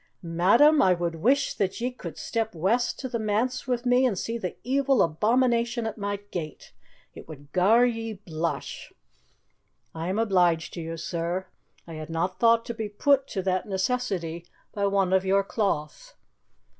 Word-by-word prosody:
"Madam, 205 - +4
I 185 -5 +4
would 170 -1 -2
wish 265 - +2
that 195 +1 -2
ye 245 +2 -1
could 170 -11 -9
step 225 -3 -3
west 220 +9 +1
to 260 - -5
the 235 -2 -3
manse 220 +5 -1
wi' 250 -1 +1
me 245 +1 +4
and 210 -6 -2
see 230 +5 -3
the 185 -7 -4
evil 270 0 +2
abomination 235 +6 +1
at 220 -1 -3
my 205 0 -2 0.2
gate. 155 -4 -6 0.4
It - - -12
would 145 -2 -12
gar 220 +7 +4
ye 225 -2 -2
blush." 170 -5 -5 1.0
"I 165 +1 -4
am 190 - -1
obliged 180 -7 +2
to 170 - -5
you, 165 0 -5
sir. 170 +3 -3 0.4
I 165 - -9
had 155 - -8
not 170 +3 -2
thought 230 0 +4
to 235 - -4
be 220 -2 -4
put 275 +6 +2
to 190 - -4
that 185 +1 -1
necessity 190 -6 -2 0.3
by 200 -1 0
one 195 -2 +1
of 190 0 +3
your 195 +1 +2
cloth." 195 -8 -3
200 Hz, 170 wpm, -26 LUFS, 175-235 Hz, 1.0 s, Madam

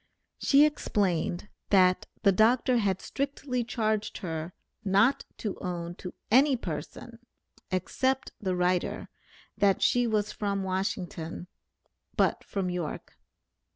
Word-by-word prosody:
She 285 +1 +6
explained, 190 - 0 0.2
that 185 -2 +4 0.2
the 200 - +6
Dr. 240 +5 +4
had 195 -4 0
strictly 275 -3 -2
charged 220 -3 -1
her 165 -2 -5 0.3
not 205 +7 +3
to 210 -4 -4
own 175 -2 -4
to 180 - -8 0.2
any 265 +2 +5
person, 190 +6 -7 0.5
except 260 +8 0
the 185 -3 0
writer, 180 0 0 0.5
that 200 -1 +3
she 245 -1 +3
was 210 -1 0
from 200 -2 -2
Washington, 185 -3 -3 0.7
but - - +2
from 190 -3 -2
York. 175 -4 -5
200 Hz, 115 wpm, -28 LUFS, 180-235 Hz, 0.7 s, She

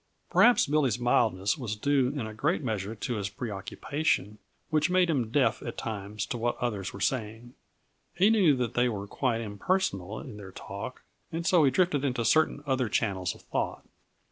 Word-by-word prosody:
Perhaps 245 - +6
Billy's 140 -4 +2
mildness 115 -2 +2
was 110 -5 -3
due 135 +3 +2
in 135 -3 -3
a 110 - -6
great 150 - 0
measure 110 -3 -2
to 115 +2 -3
his 100 -1 -2
preoccupation, 105 +1 -2 0.3
which 155 +2 +2
made 180 -1 +3
him 125 -7 0
deaf 135 +3 +2
at 120 - -6
times 105 -1 -4
to 120 - -4
what 120 +1 0
the - - -1
others 100 -6 -3
were 100 - -9
saying. 115 +1 -2 0.6
He 195 +5 +5
knew 185 -10 +5
that 125 -2 -2
they 125 0 +2
were 100 -3 -4
quite 115 +2 -1
impersonal 105 - -1
in 105 - -9
their 95 -3 -10
talk, 100 +7 -7 0.3
and 165 +1 -3
so 175 -3 +5
he - - +5
drifted 160 -3 +1
into 125 -4 0
certain 155 +3 +3
other 130 -4 0
channels 95 -5 -1
of - - -17
thought. - - -3
120 Hz, 185 wpm, -28 LUFS, 105-145 Hz, 0.6 s, Perhaps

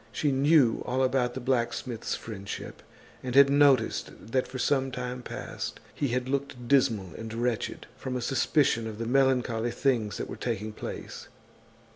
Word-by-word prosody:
She 150 - 0
knew 135 -3 +4
all 130 +2 0
about 125 -2 +1
the - - -3
blacksmith's 120 -2 -1
friendship, 100 -3 -7 0.4
and 125 -1 -4
had 140 0 +8
noticed 140 -2 +4 0.2
that 130 0 +1
for 130 - -7
some 135 +1 +1
time 125 0 -4
past - - -6
he 140 - -1
had 125 0 -1
looked 135 -3 -3
dismal 115 - +2
and 115 0 -7
wretched, 120 -1 -2
from 130 -1 -4
a 125 - -2
suspicion 125 -2 +2
of 110 -1 -6
the 115 - -3
melancholy 125 -2 +2
things 120 -4 0
that - - -4
were - - -7
taking 110 -3 -3
place. - - -7
125 Hz, 160 wpm, -28 LUFS, 115-135 Hz, 0.4 s, had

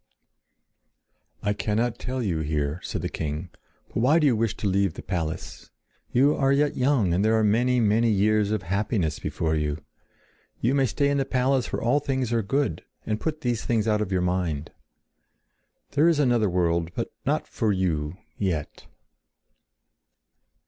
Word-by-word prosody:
"I 105 0 +1
cannot 110 +3 -1
tell 130 0 -3
you 90 -7 -1
here," 75 0 -1
said - - -4
the - - 0
king. 80 +3 -4 0.4
"But - - -6
why 130 +8 +4
do 160 - +3
you 130 -5 +4
wish 110 -2 -1
to 105 - -2
leave 95 -2 +1
the - - -8
palace? 80 -4 -4 0.4
You 140 +4 +4
are 135 -1 +2
yet 145 +1 +2
young 125 -9 +2
and 95 +3 +2
there 110 +1 +3
are 110 - +2
many, 120 +4 +3
many 115 +1 +3
years 105 0 +2
of 110 0 -1
happiness 95 -3 -1
before 80 -1 -1
you. 75 -1 -1 0.8
You 120 +4 +1
may 135 -2 +3
stay 140 +5 +1
in 140 - +1
the - - +2
palace 130 0 0
where - - -3
all 120 +5 +3
things 130 -4 -1
are 115 - +2
good, 135 - -1 0.2
and 110 0 -2
put 155 -1 -3
these 120 -4 -1
things 115 -2 0
out 105 -1 +2
of 100 -2 -3
mind. 90 -5 -1 1.2
There 150 +3 +4
is 170 -3 +4
another 120 -7 +3
world, 85 -2 +1
but - - -3
not - - 0
for 110 - 0
you—yet!" 90 -1 -3
105 Hz, 165 wpm, -25 LUFS, 90-125 Hz, 1.2 s, why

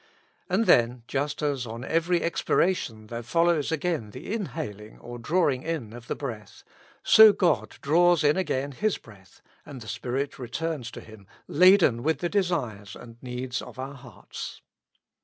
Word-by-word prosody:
And 195 +5 +2
then, 120 - +3
just 145 +2 -2
as 140 -4 -1
on 115 +2 -7
every 165 +2 +1
expiration 170 -9 0
there 115 +2 -6
follows 165 +4 +1
again 160 -7 -1
the 150 - -7
inhaling 140 - -5
or 120 0 -9
drawing 150 -1 +1
in 150 -9 -4
of 120 -1 -11
the - - -2
breath, 115 -7 -7 0.4
so 220 -1 +9
God 180 -4 0
draws 170 +2 +4
in 145 0 +4
again 145 -7 -1
His 210 +9 -1
breath, 100 -4 -18 0.2
and 140 -3 -10
the 115 - -11
Spirit 135 +7 -3
returns 130 +1 -4
to - - -9
Him 110 -3 -15 0.2
laden 180 -8 +5
with 155 +2 +1
the 175 +5 -2
desires 125 - -2
and 115 -1 -13
needs 125 0 -4
of - - -11
our 135 +2 -5
hearts. 125 -4 -10
140 Hz, 160 wpm, -26 LUFS, 120-170 Hz, 0.4 s, so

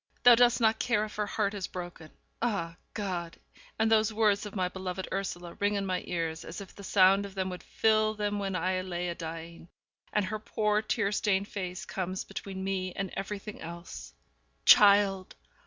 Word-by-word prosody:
Thou 245 - +10
dost 240 0 +5
not 220 -1 +3
care 215 -3 +1
if 215 - -10
her 210 -1 0
heart 205 -1 0
is 200 -3 -3
broken!' 175 -3 -8 0.3
Ah, 200 -8 -1 0.2
God! 180 -5 -3 0.4
and 220 0 +2
these 220 0 +4
words 210 -1 +2
of 205 - -10
my 185 - 0
heart 180 - -2
beloved 190 0 -4
Ursula 175 -3 -4
ring 205 +1 +1
in 200 -1 -1
my 185 -1 -1
ears 165 -2 -2
as 170 - -7
if 195 -2 -10
the 200 - -11
sound 195 0 +5
of 200 -1 -8
them 190 -1 -1
would 180 - -7
fill 215 -1 +2
them 205 -1 -1
when 195 -2 -2
I 185 +1 0
lie 185 -2 -5
a 175 0 -2
dying. 165 0 -8 0.4
And 210 -2 +1
her 215 +3 -3
poor 210 -1 0
tear 205 -2 0
stained 200 -1 +1
face 185 -3 -5
comes 185 0 -3
between 190 -1 -6
me 190 -1 -2
and 195 -2 -4
everything 205 +1 -5
else. 170 +1 -8 0.5
Child! 200 -2 +6
195 Hz, 190 wpm, -29 LUFS, 180-210 Hz, 0.5 s, Thou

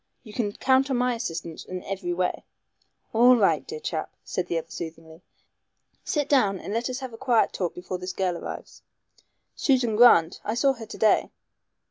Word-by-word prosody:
You 215 -4 -12
can 210 -4 -1
count 265 +3 +2
on 260 - +1
my 250 0 +1
assistance 165 -8 -5
in 185 0 -7
every 190 -2 -4
way." 180 +1 -1 0.7
"All 245 +3 +7
right, 210 -5 +4
my - - -28
dear 460 - -6
chap," - - -4
said 180 -1 -3
the 170 - -1
other 165 0 -5
soothingly, 160 0 -8 0.8
"sit 295 -3 -1
down 205 -9 +3
and 200 - -6
let 230 +3 -1
us 255 +1 -4
have 260 -3 -6
a - - -9
quiet 245 -4 +2
talk 180 -3 -2
before 180 +1 -5
this 185 +1 -4
girl 185 -2 -1
arrives." - - -8 0.7
"Susan 250 -6 +2
Grant. 200 -8 +5
I 215 - -2
saw 275 +3 +3
her 230 -4 -10
to - - -9
day." 220 - +3
215 Hz, 190 wpm, -25 LUFS, 180-250 Hz, 0.8 s, All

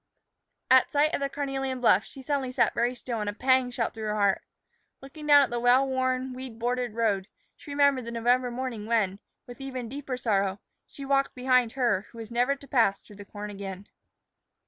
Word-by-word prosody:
At 260 -1 +6
sight 295 +1 +2
of - - 0
the 275 0 -1
carnelian 270 -2 -3
bluff, 245 - +4
she 270 - -11
suddenly 275 -2 -1
sat - - +2
very 240 +2 0
still, 240 -2 -4
and 210 - -2
a - - -4
pang 260 +2 +2
shot 240 -2 -2
through 220 -1 -6
her 210 - -1
heart. 200 -2 +2 0.6
Looking 300 +3 -10
down 290 -1 +8
at - - -3
the 240 - -1
well 250 +3 +4
worn, 260 0 -1
weed 255 -3 -8
bordered 245 -1 -2
road, 205 -5 0 0.3
she - - -15
remembered 280 -3 +2
the 235 - -5
November 245 +2 +1
morning 240 -3 -5
when, 205 -4 +1 0.3
with 245 +2 -11
even 260 -3 -5
deeper 270 -1 -5
sorrow, 200 -5 0 0.3
she 275 - -9
walked 275 0 +1
behind 250 -2 +2
her 235 -7 0
who 230 - -16
was 225 0 -8
never 245 +4 +2
to 280 0 -15
pass 225 -8 +2
through 205 - -15
the 205 - -10
corn 205 +1 -7
again. 195 -1 -7
250 Hz, 205 wpm, -27 LUFS, 225-270 Hz, 0.6 s, down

